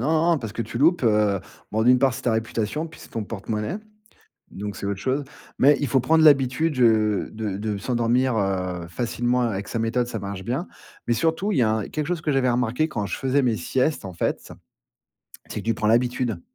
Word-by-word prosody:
non, 160 +1 +2
parce 110 -4 -6
que 115 - -3
tu 115 - -6
loupes, 165 0 +3
heu 105 -3 +3 0.3
bon 110 +1 0
d'une 125 +1 +6
part 135 0 +3
c'est - - -7
ta 120 - +1
réputation, 110 +7 -2
puis 165 - -15
c'est - - -13
ton 115 - -3
porte-monnaie, 105 - -4 0.7
donc 105 +1 -6
c'est - - -5
autre 100 -1 -2
chose, 135 +3 0 0.4
mais 145 +2 +6
il 145 - 0
faut 130 +1 +2
prendre 160 +5 +3
l'habitude, 140 +1 +4
heu, 110 -3 +3
de 110 -3 -3
de 105 -1 -3
s'endormir, 120 +2 +1
heu, 90 -4 -1
facilement 120 +5 -1
avec 100 -3 -2
sa 115 - -3
méthode, 120 +2 0
ça 115 - -4
marche 100 -1 -6
bien. 130 - -2 0.4
Mais 120 - +2
surtout, 165 - 0
il - - +1
y - - +4
a 110 - +3
un 110 -1 -1
quelque 150 -1 -3
chose 175 -2 -1
que 150 - 0
j'avais 130 -2 +2
remarqué 125 +5 +1
quand 105 -8 -3
je - - -3
faisais 135 +1 +1
mes 120 -3 +1
siestes, 130 +4 0
en 95 - -6
fait. - - -2 1.0
C'est - - -4
que - - -9
tu 115 - +2
prends 110 0 -1
l'habitude 120 -3 +1
120 Hz, 220 wpm, -24 LUFS, 105-135 Hz, 1.0 s, d'une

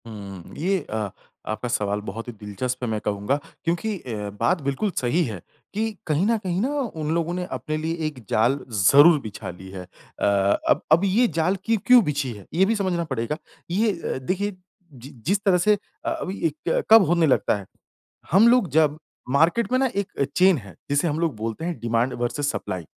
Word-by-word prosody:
हुँ, 100 -5 -9
ये 190 +4 +1
अ, 110 -2 -2 0.4
आपका 110 +3 -3
सवाल 105 -3 -1
बहुत 115 +5 -6
ही 120 - -6
दिलचस्प 120 +5 -4
है 120 - -1
मैं 110 -1 -1
कहूँगा 105 +5 -1 0.3
क्योंकि 185 +5 -1
अ, 105 -7 -5
बात 180 -3 +2
बिल्कुल 140 +9 -1
सही 145 +8 +2
है 105 -8 -6 0.3
कि 220 +2 -1 0.2
कहीं 155 +4 +2
न 230 0 +3
कहीं 185 -4 -2
ना 255 - +1 0.3
उन 155 0 -1
लोगों 170 +1 0
ने 180 0 -2
अपने 155 -2 -3
लिए 160 +2 -2
एक 150 -4 -7
जाल 125 +6 +2
ज़रूर 140 - +6
बिछा 110 -5 -7
ली 95 +1 -10
है। 95 -1 -7
अ, 90 - -8 0.4
अब - - +4
अब 165 +4 +6
ये 220 +6 +3
जाल 170 +4 +2
की 225 0 +2
क्यों 250 -2 +7
बिछी 145 -5 -1
है, 100 -3 -12
ये 185 +4 +4
भी 225 +3 +1
समझना 185 -4 0
पड़ेगा। 150 -2 -3 0.3
ये 215 +4 +2
अ, - - -2
देखिए 185 +10 -2 0.4
जि 130 +1 -11 0.2
जिस 200 +2 +1
तरह 190 -3 +4
से 210 +4 +4 0.3
अ, - - +1
अभी 190 +2 -4
ए - - -2 0.2
क - - +1
कब 225 -2 +10
होने 170 0 +3
लगता 130 - +2
है, 100 - -9 0.7
हम 200 +7 +6
लोग 240 -6 +4
जब 155 0 +3 0.3
मार्केट 165 - +2
में 255 - +3
ना 265 -1 +2
एक 195 -8 -1
चैन 185 -2 +5
है 100 -6 -13
जिसे 145 +4 +2
हम 150 +1 -2
लोग 165 -6 0
बोलते 115 +7 -4
हैं 175 -6 -3
डिमांड 115 +2 0
वर्सिज 125 +4 -1
सप्लाई। 90 - -3
155 Hz, 205 wpm, -24 LUFS, 115-185 Hz, 0.7 s, कब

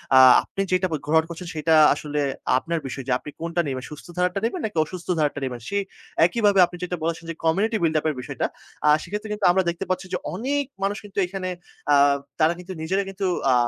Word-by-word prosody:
আ - - +9 0.2
আপনি 195 - -4
যেটা 185 0 +2
ফে 155 - 0
গ্রহণ 160 +2 +4
করছেন 170 +1 -7
সেটা 160 +1 +2 0.2
আসলে 150 0 -4 0.4
আপনার 165 +4 -2
বিষয় 135 0 -5
যে - - -1
আপনি - - -9
কোনটা 170 +1 0
নেবেন, 130 -2 -3
সুস্থ 150 - -10
ধারারটা 180 +2 +1
নিবেন 285 +10 -1
নাকি 210 -6 -5
অসুস্থ 175 +2 -9
ধারারটা 145 -2 0
নিবেন। 125 -2 -4
সেই 200 0 0 0.4
একইভাবে 205 +1 +3
আপনি 175 - -10
যেটা 180 0 -2
বলেছেন 165 0 -2
যে - - -2
community 205 +8 +2
buil 160 -1 +2
up - - -11
এর 150 - -2
বিষয়টা। 125 - -3 0.4
আ - - +7
সেক্ষেত্রে 210 +4 -5
কিন্তু 210 -2 -2
আমরা 190 +1 +2
দেখতে 170 +3 -3
পাচ্ছি 185 +1 -1
যে 180 - +2 0.2
অনেক 275 +8 0 0.2
মানুষ 200 +1 0
কিন্তু 200 -1 -14
এখানে 185 0 -4 0.4
আ - - +7 0.4
তারা 160 +1 +4
কিন্তু 185 +1 -8
নিজেরা 190 +5 0
কিন্তু 195 +1 -12 0.3
আ - - +5
180 Hz, 215 wpm, -24 LUFS, 160-195 Hz, 0.4 s, আ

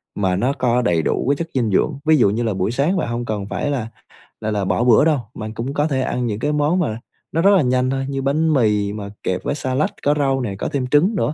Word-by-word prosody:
mà 95 -3 0
nó 125 +8 +1
có 125 -3 +1
đầy 85 -8 +1
đủ 80 - -1
cái 140 - +3
chất 165 +3 -4
dinh 115 -6 0
dưỡng, 135 - +1
ví 160 0 +5
dụ 120 - +4
như 110 +4 -1
là 110 -2 0
buổi 95 +3 -1
sáng 150 +9 +1
bạn 160 - -1
hông 120 +1 -3
cần 105 -3 -3
phải 145 - -2
là 120 -6 -2 0.5
là 110 0 -2
là 100 -2 -1
bỏ 120 - +1
bữa 125 +3 +5
đâu, 155 -3 +3
bạn 110 0 -6
cũng 120 +5 -4
có 145 +2 +1
thể 135 -3 -1
ăn 125 -1 -1
những 105 -3 -2
cái 145 +5 0
món 150 +4 +1
mà 115 -10 -1 0.3
nó 165 - 0
rất 200 +3 +5
là 180 - +4
nhanh 125 0 +1
thôi, 135 0 -1
như 135 -1 -2
bánh 155 +4 +1
mì 105 -6 +1
mà 100 -1 -6
kẹp 90 0 -2
với - - -1
xa 130 -3 -3
lách, 145 - 0
có 145 - +3
rau 135 -2 +1
nè, 105 -6 -3
có - - -2
thêm 130 -3 -1
trứng 160 - +3
nữa. 155 - 0
130 Hz, 285 wpm, -20 LUFS, 110-145 Hz, 0.5 s, ví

